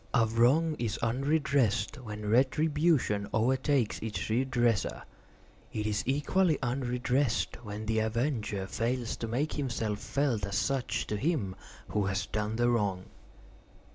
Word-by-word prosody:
A 115 - +5
wrong 130 +9 +3
is 115 -3 -1
unredressed 135 -1 +1
when 105 -4 -6
retribution 135 -2 +2
overtakes 130 +1 +1
its 110 -1 -4
redresser. 120 -3 +1 0.7
It 105 -1 -3
is 105 -1 0
equally 150 +4 +2
unredressed 125 -1 0
when 105 0 -6
the 110 0 +1
avenger 110 -3 -1
fails 115 +4 -2
to 115 - -4
make 130 +7 -1
himself 115 -7 -2
felt 135 -7 0
as 100 - -2
such 135 -2 0
to 105 - -2
him 125 - -1 0.3
who 105 -2 0
has 95 0 -1
done 105 +2 -2
the 120 +1 +2
wrong. 100 -5 -1
120 Hz, 130 wpm, -30 LUFS, 110-135 Hz, 0.7 s, A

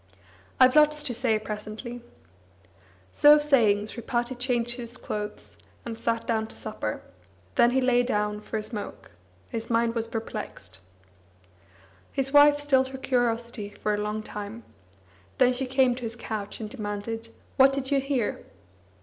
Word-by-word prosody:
"I've 255 +1 +6
lots 300 0 +5
to 265 -4 0
say, 230 -2 +1
presently." 215 +3 -6 1.1
So 295 - +7
saying, 235 -9 +3
Sripati 240 +2 -3
changed 240 -1 -1
his 240 0 -6
clothes, 210 0 -5 0.3
and 230 -1 -4
sat 230 0 -1
down 220 -1 0
to - - -10
supper; 215 - -4 0.5
then 235 - +5
he 265 +2 +2
lay 250 -1 +4
dawn 210 -3 -1
for 220 - -4
a 215 - -3
smoke. 210 -2 -7 0.4
His 225 0 -5
mind 230 0 +2
was 230 -1 -2
perplexed. 215 - -6 1.3
His 270 0 -1
wife 290 0 +7
stilled 270 -3 +2
her 265 0 -7
curiosity 235 -4 -1
for 210 +1 -2
a - - 0
long 210 +1 -3
time; 210 +2 -7 0.7
then 250 0 +5
she 255 +1 -2
came 260 -1 +3
to 250 - -8
his 230 -1 -3
couch 215 -3 -5
and 220 - -4
demanded: 210 +2 -5 0.3
"What 270 +1 +7
did 270 0 -3
you 280 - +4
hear?" 270 -5 -1
235 Hz, 150 wpm, -27 LUFS, 215-260 Hz, 1.3 s, So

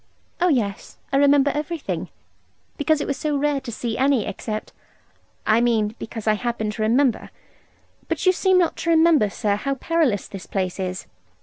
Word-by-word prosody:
'Oh, 360 - +3
yes, 225 - -1 0.2
I - - +4
remember 285 0 +4
everything; 300 +1 -4 0.7
because 310 0 +1
it - - -2
was 280 - -2
so 295 0 -1
rare 285 -1 0
to 250 - -7
see 230 0 -4
any 265 -4 +2
except 215 +2 -5 0.7
I 220 +2 +4
mean 225 -3 +1
because 225 -1 -7
I 215 - +4
happen 220 -1 -2
to 215 - -6
remember. 240 +3 +2 0.8
But - - -2
you 370 - +7
seem 375 0 +2
not 350 -2 +2
to 335 - -3
remember, 320 -9 +4
sir, 200 +1 -1
how 275 +6 -2
perilous 290 - 0
this 195 -2 -9
place 185 -1 -2
is.' 185 -1 -4
255 Hz, 175 wpm, -22 LUFS, 215-295 Hz, 0.8 s, you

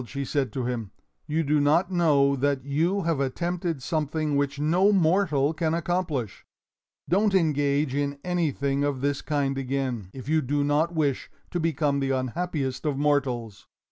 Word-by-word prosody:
she 140 +2 -4
said 140 -1 -1
to 130 -4 -3
him, 120 -4 -3 0.4
"you 160 +2 0
do 150 0 +2
not 160 +6 +2
know 145 -6 +3
that 135 -1 0
you 170 +8 0
have 165 -4 0
attempted 170 +2 -2
something 155 -1 -1
which 140 0 0
no 175 +7 +3
mortal 160 -6 +2
can 160 0 0
accomplish. 165 - -2 0.6
Don't 200 +3 +2
engage 145 -4 +1
in 140 0 -1
anything 145 -6 0
of 140 -3 -1
this 140 0 0
kind 140 -2 -1
again, 130 -6 -2
if 130 +3 -10
you 155 +1 +2
do 145 +2 0
not 150 +4 +1
wish 145 -4 0 0.2
to 175 - -1
become 150 -3 0
the 135 -1 -1
unhappiest 135 +1 -2
of 150 -3 -1
mortals! 130 -7 -1
145 Hz, 160 wpm, -26 LUFS, 135-165 Hz, 0.6 s, know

